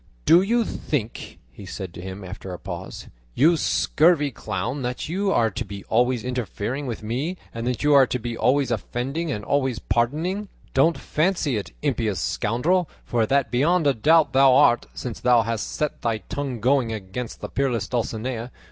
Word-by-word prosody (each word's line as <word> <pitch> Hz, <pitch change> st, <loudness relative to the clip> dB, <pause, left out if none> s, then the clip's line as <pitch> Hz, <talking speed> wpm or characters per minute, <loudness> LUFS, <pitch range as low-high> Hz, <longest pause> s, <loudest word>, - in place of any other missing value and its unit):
"Do 170 Hz, +2 st, +7 dB
you 230 Hz, +4 st, +1 dB
think," 120 Hz, -, -4 dB
he 100 Hz, -, -12 dB
said 95 Hz, -1 st, -7 dB
to 90 Hz, -, -9 dB
him 95 Hz, +2 st, -7 dB
after 95 Hz, +1 st, -8 dB
a 90 Hz, -, -5 dB
pause, -, -, -7 dB, 0.3 s
"you 165 Hz, +6 st, +5 dB
scurvy 155 Hz, -1 st, +2 dB
clown, 110 Hz, +5 st, -4 dB
that 125 Hz, 0 st, -3 dB
you 195 Hz, +5 st, 0 dB
are 115 Hz, -, +2 dB
to 120 Hz, -, -3 dB
be 100 Hz, -2 st, -8 dB
always 120 Hz, +1 st, +2 dB
interfering 125 Hz, -, -3 dB
with 115 Hz, -2 st, -5 dB
me, 135 Hz, +12 st, -2 dB, 0.2 s
and 115 Hz, +1 st, -4 dB
that 125 Hz, +1 st, -2 dB
you 150 Hz, 0 st, +4 dB
are 135 Hz, -2 st, +7 dB
to 125 Hz, -, -1 dB
be 120 Hz, -1 st, -5 dB
always 130 Hz, +2 st, +2 dB
offending 135 Hz, +8 st, -2 dB
and 105 Hz, -5 st, -4 dB
I -, -, -15 dB
always 130 Hz, -4 st, +1 dB
pardoning? 155 Hz, -, -1 dB, 0.2 s
Don't 155 Hz, +3 st, +3 dB
fancy 155 Hz, -2 st, 0 dB
it, 105 Hz, -, -4 dB
impious 115 Hz, -, 0 dB
scoundrel, 150 Hz, -, 0 dB, 0.2 s
for 115 Hz, -2 st, +1 dB
that 135 Hz, -3 st, +1 dB
beyond 155 Hz, +7 st, +2 dB
a 140 Hz, -, +4 dB
doubt 155 Hz, +7 st, +3 dB
thou 135 Hz, -1 st, +6 dB
art, 130 Hz, -4 st, +4 dB
since 120 Hz, -4 st, -5 dB
thou 120 Hz, -2 st, +4 dB
hast 115 Hz, 0 st, -3 dB
set 150 Hz, -1 st, -3 dB
thy 115 Hz, -2 st, 0 dB
tongue 125 Hz, +5 st, -5 dB
going 130 Hz, -2 st, +2 dB
against 110 Hz, +3 st, -6 dB
the -, -, -5 dB
peerless 130 Hz, -5 st, -1 dB
Dulcinea. 120 Hz, 0 st, -3 dB
125 Hz, 185 wpm, -24 LUFS, 115-145 Hz, 0.3 s, Do